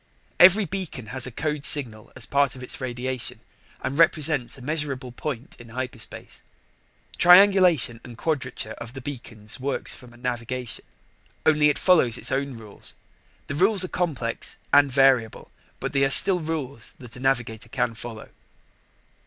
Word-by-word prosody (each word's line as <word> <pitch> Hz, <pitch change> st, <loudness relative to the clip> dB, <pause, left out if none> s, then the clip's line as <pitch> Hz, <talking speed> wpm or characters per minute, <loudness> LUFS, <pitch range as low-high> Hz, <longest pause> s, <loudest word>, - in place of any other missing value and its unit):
Every 190 Hz, +4 st, +7 dB
beacon 180 Hz, -, -5 dB
has 130 Hz, -1 st, -1 dB
a -, -, -7 dB
code 150 Hz, +3 st, -3 dB
signal 115 Hz, -8 st, +2 dB
as 130 Hz, -4 st, -2 dB
part 140 Hz, +1 st, +1 dB
of 130 Hz, -, -10 dB
its 125 Hz, -, -6 dB
radiation 130 Hz, 0 st, -4 dB, 0.4 s
and 140 Hz, +4 st, -3 dB
represents 150 Hz, -6 st, +3 dB
a -, -, -12 dB
measurable 140 Hz, -3 st, -4 dB
point 125 Hz, 0 st, -6 dB
in 120 Hz, -1 st, -13 dB
hyperspace. 125 Hz, -1 st, -7 dB, 0.8 s
Triangulation 180 Hz, -, +6 dB
and 120 Hz, -2 st, -11 dB
quadrature 130 Hz, -7 st, -3 dB
of 115 Hz, +1 st, -8 dB
the 135 Hz, -, -8 dB
beacons 115 Hz, -4 st, -6 dB
works 135 Hz, +1 st, +2 dB
for 125 Hz, -, -12 dB
navigation 120 Hz, 0 st, -5 dB, 0.6 s
only 150 Hz, -1 st, +4 dB
it 150 Hz, -, 0 dB
follows 155 Hz, -11 st, +3 dB
its -, -, 0 dB
own 135 Hz, -1 st, -2 dB
rules. 110 Hz, -3 st, -11 dB, 0.5 s
The -, -, -5 dB
rules 190 Hz, +5 st, +3 dB
are -, -, -8 dB
complex 135 Hz, -10 st, -2 dB, 0.2 s
and 145 Hz, -1 st, +5 dB
variable, 130 Hz, -4 st, +2 dB, 0.3 s
but -, -, -4 dB
they 135 Hz, -1 st, +2 dB
are 135 Hz, -, +3 dB
still 180 Hz, +6 st, +5 dB
rules 145 Hz, -7 st, -4 dB
that 125 Hz, -3 st, -13 dB
a -, -, -10 dB
navigator 120 Hz, -3 st, -1 dB
can 125 Hz, -1 st, -1 dB
follow. 115 Hz, -1 st, -9 dB
130 Hz, 155 wpm, -24 LUFS, 120-150 Hz, 0.8 s, Every